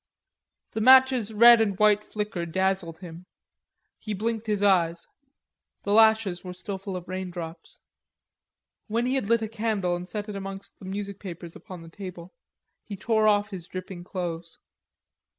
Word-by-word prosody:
The 220 - -3
match's 260 -2 +6
red 235 +2 +7
and 200 -4 0
white 210 0 +4
flicker 210 -6 -4
dazzled 190 -1 -1
him. 175 0 -10 0.7
He 215 -2 -4
blinked 225 +2 -3
his 205 -1 0
eyes; 170 -4 +2 0.8
the 200 - 0
lashes 220 -4 +4
were 180 -1 -7
still 190 +1 -6
full 195 0 -6
of 180 -1 -7
raindrops. 175 -3 -7 1.1
When 230 +2 0
he 255 - 0
had 265 -6 -1
lit 230 -1 +3
a - - -2
candle 210 -5 -1
and 180 +1 -7
set 210 -1 -5
it 210 - -6
amongst 195 0 -8
the - - -11
music 200 +1 -5
papers 175 -3 -9
upon 180 -3 -10
the - - -12
table, 180 -1 -9 0.5
he 205 - -7
tore 220 +1 +2
off 205 0 +2
his 180 -3 -7
dripping 185 -1 -7
clothes. 170 -2 -5
195 Hz, 160 wpm, -26 LUFS, 180-215 Hz, 1.1 s, red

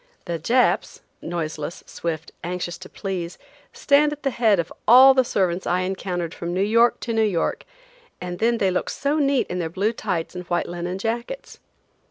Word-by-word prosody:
The 170 -2 -3
"Japs," 245 - +1 0.2
noiseless, 160 -1 -4
swift, 160 -2 -5
anxious 175 0 -4
to 185 - -11
please, 180 -4 -5 0.3
stand 295 +1 +3
at 295 0 -7
the 275 - +1
head 225 -4 +3
of 165 - -3
all 260 +4 +9
the 260 -1 +4
servants 185 -6 -1
I 180 +1 +1
encountered 185 -2 -3
from 175 +1 -4
New 190 - +2
York 230 +3 +3
to 235 - -3
New 225 - +2
York; 200 -6 0 0.5
and 180 -1 -6
then 235 +1 +2
they 195 -4 +2
look 180 - -1
so 285 +2 -1
neat 275 -2 +2
in 180 - -4
their 165 -2 -2
blue 200 +7 0
tights 185 -7 -3
and 180 0 -6
white 175 0 -1
linen 175 +1 -4
jackets. 235 - -4
185 Hz, 185 wpm, -23 LUFS, 175-235 Hz, 0.5 s, all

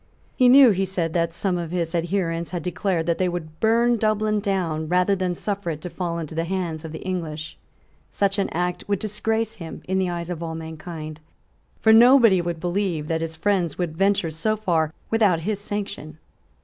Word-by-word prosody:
He 255 -2 +5
knew, 260 -2 +8
he 195 -1 0
said, 180 -4 -2
that 170 -1 +1
some 180 +1 -1
of 170 -2 -4
his 170 -1 -2
adherents 170 -1 -1
had 175 -3 -4
declared 180 -2 -1
that 170 0 0
they 185 -1 +2
would 160 -3 -6
burn 235 +2 +3
Dublin 215 0 +1
down 180 -6 -1
rather 180 +3 +2
than 185 -2 -1
suffer 200 -1 -3
it 155 -2 -4
to 180 - -6
fall 170 0 -3
into 160 -2 -5
the 165 +1 -1
hands 170 -3 -3
of 160 - -7
the 160 - -7
English. 160 -4 -4 0.5
Such 200 0 0
an 195 - 0
act 180 +1 -2
would 200 -1 +1
disgrace 220 +2 -2
him 165 -3 -8
in 190 +1 0
the 185 -1 0
eyes 170 0 -4
of 170 -2 -5
all 165 -1 -4
mankind: 160 -1 -7 0.6
for 220 - +6
nobody 230 -5 +7
would 170 -1 -3
believe 175 -3 -1
that 165 0 0
his 165 0 -4
friends 180 -2 0
would 175 -3 -2
venture 195 -2 +1
so 215 +8 -1
far 165 -7 0 0.2
without 205 -7 +3
his 205 +3 -2
sanction. 200 -7 -5
180 Hz, 200 wpm, -23 LUFS, 165-200 Hz, 0.6 s, knew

